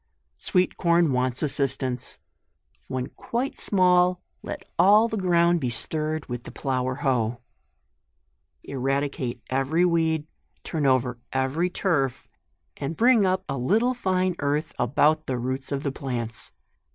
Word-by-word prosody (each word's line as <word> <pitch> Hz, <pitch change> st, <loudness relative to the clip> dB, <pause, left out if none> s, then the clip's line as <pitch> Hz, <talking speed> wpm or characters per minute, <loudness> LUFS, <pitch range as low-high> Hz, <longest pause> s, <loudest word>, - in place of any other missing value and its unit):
SWEET 180 Hz, -1 st, +1 dB
CORN 170 Hz, -3 st, +3 dB
Wants 125 Hz, +1 st, 0 dB
assistance. 135 Hz, -3 st, +1 dB, 0.7 s
When 130 Hz, -1 st, -3 dB
quite 240 Hz, -, -4 dB
small, 180 Hz, -2 st, +3 dB, 0.2 s
let -, -, -7 dB
all 210 Hz, +4 st, +6 dB
the 220 Hz, -, -4 dB
ground 175 Hz, -3 st, +3 dB
be 130 Hz, -5 st, -1 dB
stirred 155 Hz, +6 st, -2 dB
with 120 Hz, -1 st, -5 dB
the -, -, -8 dB
plough 130 Hz, -2 st, -2 dB
or 130 Hz, 0 st, -2 dB
hoe* 120 Hz, -4 st, 0 dB, 1.2 s
Eradicate 135 Hz, -2 st, -2 dB
every 135 Hz, +7 st, +2 dB
weed; 160 Hz, -3 st, +1 dB, 0.4 s
turn 155 Hz, -4 st, -1 dB
over 125 Hz, -2 st, +1 dB
every 135 Hz, +7 st, 0 dB
turf, 150 Hz, -9 st, -1 dB, 0.5 s
and 145 Hz, +4 st, -4 dB
bring 230 Hz, -4 st, +5 dB
up 185 Hz, 0 st, 0 dB
a 135 Hz, -, -3 dB
little 220 Hz, -, +2 dB
fine 185 Hz, -6 st, 0 dB
earth 145 Hz, +2 st, -1 dB
about 150 Hz, +5 st, +2 dB
the 130 Hz, -, -1 dB
roots 130 Hz, +3 st, -4 dB
of 140 Hz, 0 st, -2 dB
the 140 Hz, -, -1 dB
plants. 120 Hz, -5 st, -5 dB
145 Hz, 135 wpm, -25 LUFS, 130-180 Hz, 1.2 s, all